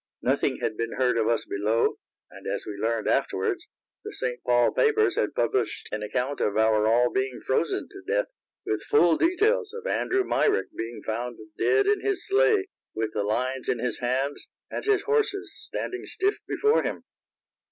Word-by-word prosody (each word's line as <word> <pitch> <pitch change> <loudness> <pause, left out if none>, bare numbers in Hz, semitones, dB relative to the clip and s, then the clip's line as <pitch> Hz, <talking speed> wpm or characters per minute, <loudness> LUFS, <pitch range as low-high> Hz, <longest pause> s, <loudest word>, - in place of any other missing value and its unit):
Nothing - - +1
had 110 - -1
been 115 0 -2
heard 125 -1 +2
of 110 - +1
us 115 - +1
below, 105 +3 0 0.3
and, - - -10
as - - -2
we 105 - -5
learned 110 +2 -1
afterwards, - - 0 0.4
the - - -6
St. 125 -1 -4
Paul 120 -1 +3
papers 435 -1 +3
had - - -1
published 410 - 0
an 105 - -3
account 125 +6 -2
of 105 - +1
our 110 -1 +3
all 120 +2 +4
being 130 -1 -1
frozen 145 +5 0
to 390 -1 -12
death, - - +1 0.4
with 110 0 -1
full 165 +9 +4
details 420 - +2
of 470 0 -7
Andrew 385 -5 +1
Myrick 420 +2 +1
being 115 +1 -5
found 120 +2 -3 0.2
dead 420 -1 +3
in 410 -1 +2
his 405 -2 -1
sleigh, 420 -1 +3 0.3
with 110 0 -2
the 105 - 0
lines 125 +5 -1
in - - +1
his 125 +1 -2
hands 130 +3 -1 0.2
and - - -3
his 415 -1 +2
horses 425 -3 0
standing 375 - -5
stiff 400 +2 0
before 430 +2 +3
him. - - -4
130 Hz, 175 wpm, -26 LUFS, -, 0.4 s, all